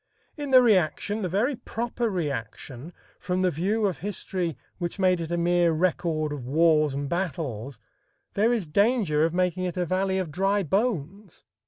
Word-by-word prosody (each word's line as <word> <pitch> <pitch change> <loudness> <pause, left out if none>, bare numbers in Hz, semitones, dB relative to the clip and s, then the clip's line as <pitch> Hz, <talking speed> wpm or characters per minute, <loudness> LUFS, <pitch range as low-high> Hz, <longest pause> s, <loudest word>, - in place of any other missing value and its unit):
In 290 -2 -5
the 255 -1 +7
reaction, 205 0 +2
the 185 - -2
very 225 - +1
proper 235 0 -3
reaction 140 - -5 0.3
from 180 0 -1
the 180 - +3
view 200 +8 0
of 185 -8 -1
history 180 -4 -3 0.2
which 175 +1 -3
made 185 -2 +2
it 165 0 -5
a 175 - 0
mere 175 0 +3
record 155 -2 0
of 140 -4 -6
wars 155 +1 +3
and 140 0 -3
battles 140 - -3 0.6
there 220 +4 +2
is 230 -7 0
danger 195 -2 +2
of 165 - 0
making 185 0 0
it 180 0 -4
a 180 - 0
valley 190 +2 0
of 185 -5 -2
dry 195 +5 +1
bones. 195 - -2
180 Hz, 170 wpm, -26 LUFS, 155-200 Hz, 0.6 s, the